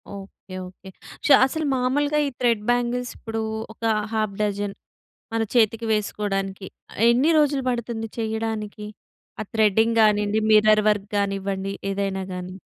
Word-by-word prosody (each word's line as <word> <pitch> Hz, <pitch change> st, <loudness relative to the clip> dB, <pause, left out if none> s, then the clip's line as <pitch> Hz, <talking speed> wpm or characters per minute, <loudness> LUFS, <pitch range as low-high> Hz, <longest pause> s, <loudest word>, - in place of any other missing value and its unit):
Okay. 195 Hz, -1 st, -11 dB
Okay. 190 Hz, +1 st, -14 dB, 0.4 s
Show 285 Hz, -, +6 dB
అసలు 315 Hz, +4 st, -3 dB
మామూలుగా 285 Hz, +4 st, +1 dB
ఈ -, -, -1 dB
థ్రెడ్ 235 Hz, -4 st, +2 dB
బ్యాంగిల్సిప్పుడూ 240 Hz, -2 st, -1 dB, 0.3 s
ఒక 230 Hz, -, -18 dB, 0.3 s
హాఫ్ 215 Hz, -2 st, -1 dB
డజన్ 205 Hz, -1 st, -1 dB, 0.6 s
మన 225 Hz, -, +1 dB
చేతికి 225 Hz, -1 st, +2 dB
వేసుకోడానికి 195 Hz, -2 st, -2 dB, 0.4 s
ఎన్ని 255 Hz, +7 st, +3 dB
రోజులు 290 Hz, -2 st, +2 dB
బడుతుంది 235 Hz, -2 st, -3 dB
చేయడానికి? 220 Hz, -2 st, -3 dB, 0.5 s
ఆ -, -, 0 dB
థ్రెడింగ్ 220 Hz, +1 st, +3 dB
గానీండి, 210 Hz, 0 st, +2 dB
మిర్రర్ 215 Hz, 0 st, +5 dB
వర్క్ 205 Hz, -1 st, -2 dB
గానివ్వండి 195 Hz, -1 st, -2 dB, 0.2 s
ఏదైనా 195 Hz, -1 st, -2 dB
గానీ? 180 Hz, 0 st, -6 dB
215 Hz, 125 wpm, -23 LUFS, 200-235 Hz, 0.6 s, Show